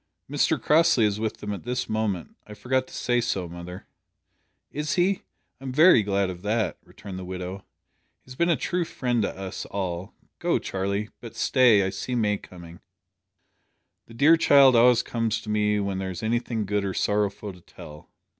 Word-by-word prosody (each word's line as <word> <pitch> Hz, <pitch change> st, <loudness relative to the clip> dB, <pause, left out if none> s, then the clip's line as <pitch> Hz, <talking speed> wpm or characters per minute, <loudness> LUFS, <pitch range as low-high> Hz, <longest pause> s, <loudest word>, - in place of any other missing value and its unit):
"Mr -, -, +1 dB
Crossley 155 Hz, -7 st, +4 dB
is 105 Hz, 0 st, 0 dB
with 110 Hz, 0 st, -2 dB
them 105 Hz, 0 st, -5 dB
at 100 Hz, -, -6 dB
this 125 Hz, +1 st, -3 dB
moment. 110 Hz, -5 st, -2 dB
I 105 Hz, -, -10 dB
forgot 130 Hz, +4 st, -1 dB
to -, -, -15 dB
say 120 Hz, -1 st, +1 dB
so, 95 Hz, -6 st, -2 dB
mother." 85 Hz, +1 st, -9 dB, 0.9 s
"Is 150 Hz, 0 st, -2 dB
he? 185 Hz, +2 st, +1 dB, 0.4 s
I'm 135 Hz, -1 st, -6 dB
very 155 Hz, -2 st, +6 dB
glad 100 Hz, -2 st, 0 dB
of 90 Hz, -1 st, -10 dB
that," 110 Hz, +2 st, -1 dB
returned 95 Hz, -3 st, -10 dB
the -, -, -7 dB
widow. 90 Hz, +1 st, -5 dB, 0.7 s
"He 130 Hz, -, -17 dB
has -, -, -9 dB
been 170 Hz, +5 st, +1 dB
a 170 Hz, -, +4 dB
true 180 Hz, +3 st, -1 dB
friend 125 Hz, -7 st, -1 dB
to 100 Hz, -, -3 dB
us 95 Hz, -1 st, -6 dB
all. 95 Hz, -1 st, -4 dB, 0.2 s
Go, -, -, +1 dB
Charlie. 100 Hz, +2 st, -3 dB
But 115 Hz, -2 st, -10 dB
stay. 115 Hz, -4 st, +4 dB
I 95 Hz, -, -2 dB
see 125 Hz, -, -4 dB
May 105 Hz, -3 st, +1 dB
coming. 85 Hz, -2 st, -13 dB, 1.3 s
The 115 Hz, -, -14 dB
dear 150 Hz, +6 st, +5 dB
child 140 Hz, -5 st, +6 dB
always 120 Hz, 0 st, +5 dB
comes 115 Hz, -2 st, -1 dB
to 110 Hz, -, -10 dB
me 105 Hz, 0 st, +1 dB
when 100 Hz, -1 st, -2 dB
there 95 Hz, 0 st, -3 dB
is 95 Hz, +3 st, -7 dB
anything 115 Hz, -1 st, -1 dB
good 105 Hz, 0 st, -1 dB
or 95 Hz, -1 st, -3 dB
sorrowful 105 Hz, -1 st, -1 dB
to 90 Hz, -, -16 dB
tell. 75 Hz, -2 st, -13 dB
105 Hz, 185 wpm, -25 LUFS, 95-125 Hz, 1.3 s, very